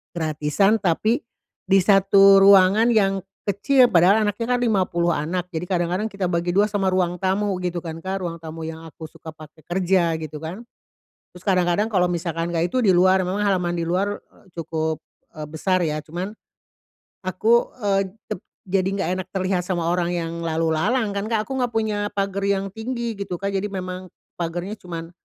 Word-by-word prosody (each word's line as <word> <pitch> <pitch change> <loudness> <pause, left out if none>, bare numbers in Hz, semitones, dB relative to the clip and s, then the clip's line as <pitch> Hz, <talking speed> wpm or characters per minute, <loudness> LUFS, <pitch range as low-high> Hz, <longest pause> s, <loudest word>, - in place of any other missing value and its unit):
gratisan, 160 +6 +1
tapi 215 +6 +1 0.5
di 195 - +6
satu 195 0 +6
ruangan 200 +3 +6
yang 195 -4 +2 0.3
kecil, 245 +6 +3
padahal 185 +5 +5
anaknya 205 +2 -2
kan - - -4
50 185 -6 +1
anak, 175 +4 -3
jadi 165 +2 -3
kadang-kadang 180 +3 0
kita 200 -2 -3
bagi 170 0 -1
dua 200 +3 +4
sama 205 -2 -1
ruang 180 -1 0
tamu 195 +2 0
gitu 180 -1 -2
kan, 165 -1 -6
Kak, 190 +1 -3
ruang 170 -1 -4
tamu 160 0 -8
yang 160 0 -7
aku 160 0 -10
suka 165 0 -11
pakai 155 0 -15
kerja 180 -1 +1
gitu 155 -1 -6
kan. 170 +8 -6 0.7
Terus 180 - -15
kadang-kadang 185 +1 +2
kalau 190 -5 +2
misalkan 170 -1 -2
enggak 170 +1 +1
itu 255 - +2
di 195 - +5
luar, 185 +1 +4
memang 190 +3 -2
halaman 180 -3 +1
di 170 - -1
luar 200 +4 -1
e - - -28 0.2
cukup 160 -1 -2 0.3
e 155 - -11
besar 185 +4 0
ya, 155 -2 -1
cuman 175 +6 -5 0.9
aku, 220 +6 +2
eee, 200 -3 +1 0.3
tep 210 - -3 0.3
jadi 185 -1 +1
nggak 195 -2 -1
enak 185 - -4
terlihat 185 -1 0
sama 175 -3 -1
orang 175 0 0
yang 165 -1 -3
lalu 165 0 0
lalang 230 +5 +1
kan, 200 +1 -2
Kak, 220 -1 0
aku 265 -1 -4
nggak 245 -2 -1
punya 220 -2 0 0.2
pagar 195 0 -2
yang 195 -1 0
tinggi 230 +1 -4
gitu, 200 -2 -4
Kak, 200 +2 -2
jadi 195 +1 0
memang 185 -2 -5 0.3
pagarnya 175 +5 -4
cuman 165 -3 -7
185 Hz, 180 wpm, -22 LUFS, 170-200 Hz, 0.9 s, di